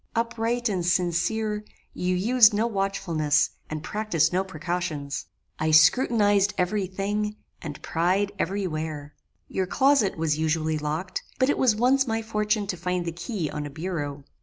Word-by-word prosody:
Upright 235 +1 0
and 190 -5 -1
sincere, 185 +5 0 0.3
you 180 0 -1
used 220 +3 +5
no 215 +2 +2
watchfulness, 180 -8 0 0.2
and 155 0 -5
practised 180 -7 0
no 185 +1 +2
precautions. 170 -5 -4 0.3
I 155 - +1
scrutinized 205 +4 +4
every 185 +2 0
thing, 205 +3 -2 0.3
and 150 -4 -7
pried 185 +5 +1
every 195 +3 -1
where. 155 -3 -4 0.3
Your 190 -1 -2
closet 265 -4 +3
was 155 -1 0
usually 160 0 0
locked, 155 +5 -3 0.2
but 260 +2 +3
it - - -1
was 250 -5 +4
once 260 +4 +3
my 225 0 -1
fortune 210 -1 0
to 190 -2 -3
find 180 0 -2
the 170 - -2
key 175 - -4
on 150 -1 -4
a - - -8
bureau. 145 -3 -4
185 Hz, 155 wpm, -25 LUFS, 160-215 Hz, 0.3 s, used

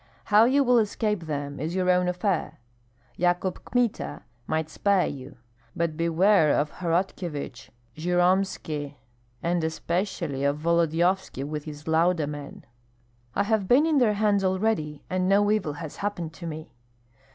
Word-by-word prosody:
How 210 +2 +5
you 275 +3 +4
will 250 -2 +4
escape 210 -4 -1
them 145 -1 -4
is 160 +5 -3
your 185 -1 0
own 180 0 +2
affair. 180 0 -1 0.6
Yakub 180 +1 0
Kmita 245 -3 -1 0.2
might 155 0 -1
spare 195 +3 +2
you; 135 -1 -7 0.4
but 170 -2 -1
beware 170 +1 +3
of 150 +1 0
Horotkyevich, 165 -7 -3 0.3
Jyromski, 175 -4 0 0.5
and 170 0 0
especially 165 -3 -2
of 140 +1 +1
Volodyovski 170 0 +1
with 150 +1 -5
his 150 0 -9
Lauda 165 0 +2
men." 145 -1 -8 0.7
"I 200 - +2
have 210 -2 0
been 265 +8 +5
in 315 -3 +3
their 220 -4 +3
hands 205 -1 +2
already, 185 -6 0
and 185 0 0
no 205 +1 +4
evil 200 -9 0
has 155 0 -8
happened 175 -6 -3
to 170 0 -8
me." 155 0 -7
175 Hz, 140 wpm, -26 LUFS, 155-200 Hz, 0.7 s, How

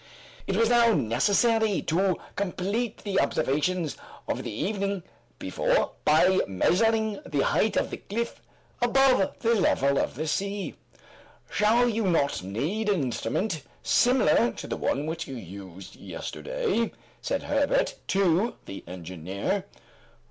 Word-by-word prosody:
It 195 - 0
was 230 0 +4
now 235 -1 +5
necessary 205 - +2
to 185 +3 +1 0.2
complete 200 +4 -2
the 195 -2 0
observations 155 +3 0 0.3
of - - -2
the - - -4
evening 195 - -2 0.3
before - - 0
by 180 +5 +5
measuring 220 - +2
the 140 -2 0
height 220 - +2
of - - 0
the - - -4
cliff 235 +4 -4 0.4
above 255 -3 +3
the 230 0 +3
level 140 - +2
of - - -1
the 155 +4 -3
sea. 200 +4 -2 0.8
"Shall 230 +4 +3
you 225 -2 0
not 150 - +1
need 150 - -2
an 190 -8 +2
instrument 155 - -2 0.2
similar 215 - +4
to - - -8
the - - -3
one 140 +2 -1
which 165 +1 -4
you 135 - -6
used 95 -3 -10
yesterday?" 475 - -3 0.3
said - - -2
Herbert - - +1
to 195 +3 +2
the 100 - -8
engineer. 95 - -4
195 Hz, 130 wpm, -27 LUFS, 140-225 Hz, 0.8 s, now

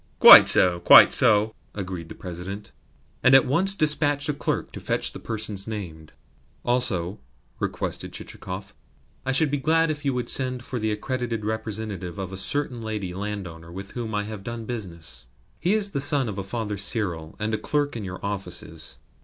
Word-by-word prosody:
"Quite - - +11
so, 90 -1 +3
quite - - +8
so," 110 0 +3 0.2
agreed 90 -4 -6
the - - -9
President, 95 +3 -7 0.5
and 125 +1 +6
at 135 - +7
once 185 +9 +1
dispatched 150 -3 +2
a - - +1
clerk 145 - -3
to - - -8
fetch - - -1
the - - -8
persons 110 -3 -3
named. 85 -8 -7 0.5
"Also," 105 -7 -1 0.4
requested - - -3
Chichikov, 95 +1 -8 0.5
"I - - +2
should 140 +2 +2
be 145 - 0
glad 160 +3 +2
if 145 -1 -6
you 140 -3 0
would 125 -1 -2
send 130 -1 0
for 125 0 -4
the 110 0 -1
accredited 115 0 -3
representative 110 -4 -4
of 95 -1 -5
a - - -5
certain 125 +4 0
lady 105 -5 -4
landowner 90 -5 -6
with 95 +2 -8
whom 115 -3 -4
I 105 - 0
have 105 -1 -7
done 115 +1 -6
business. 85 - -6 0.3
He 185 +5 +2
is 205 -2 0
the 140 - -2
son 145 -2 +3
of 100 -2 -4
a - - -1
Father 105 +1 -4
Cyril, 95 -6 0
and 110 0 -2
a 110 - 0
clerk 145 -2 -1
in 115 - -5
your 95 -1 -6
offices." 90 -5 -5
110 Hz, 180 wpm, -24 LUFS, 95-130 Hz, 0.5 s, Quite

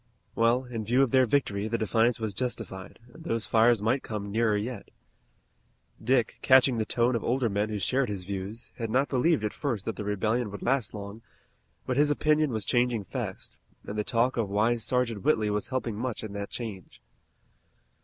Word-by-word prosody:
Well, 115 +3 +2
in 115 -3 -5
view 125 +5 +3
of 130 - 0
their 130 -1 +4
victory, 105 -6 0
the 115 +1 -1
defiance 115 +2 +2
was 110 -2 -3
justified, 100 -4 -5 0.2
and 160 - -13
those 115 -9 -2
fires 115 -1 +4
might 125 +5 +2
come 105 -2 -5
nearer 110 -1 +2
yet. 110 +1 -5 1.1
Dick, 120 0 +1
catching 130 -2 +5
the 110 - -1
tone 120 +1 +2
of 115 - -2
older 125 -1 +1
men 105 +1 0
who 105 - -2
shared 130 +6 +1
his 100 -3 -4
views, 100 +4 -6
had 115 -2 -3
not 130 +5 +1
believed 145 +2 +2
at 105 - -1
first 120 -9 -3
that 115 - -3
the 105 - -4
rebellion 110 +3 0
would 100 - -8
last 125 -5 0
long, 100 +2 -7 0.6
but 130 -1 -1
his 145 +1 +4
opinion 155 +1 +2
was 110 -5 -3
changing 120 -3 +1
fast, - - -6 0.3
and 100 - -6
the 105 - 0
talk 120 +4 +1
of 110 -4 0
wise 110 +3 +1
Sergeant 120 -5 0
Whitley 110 -8 +2
was 105 0 -2
helping 125 -4 -2
much 120 -1 -3
in 105 -2 -6
that 100 0 -5
change. 110 -6 -7
115 Hz, 195 wpm, -28 LUFS, 105-125 Hz, 1.1 s, catching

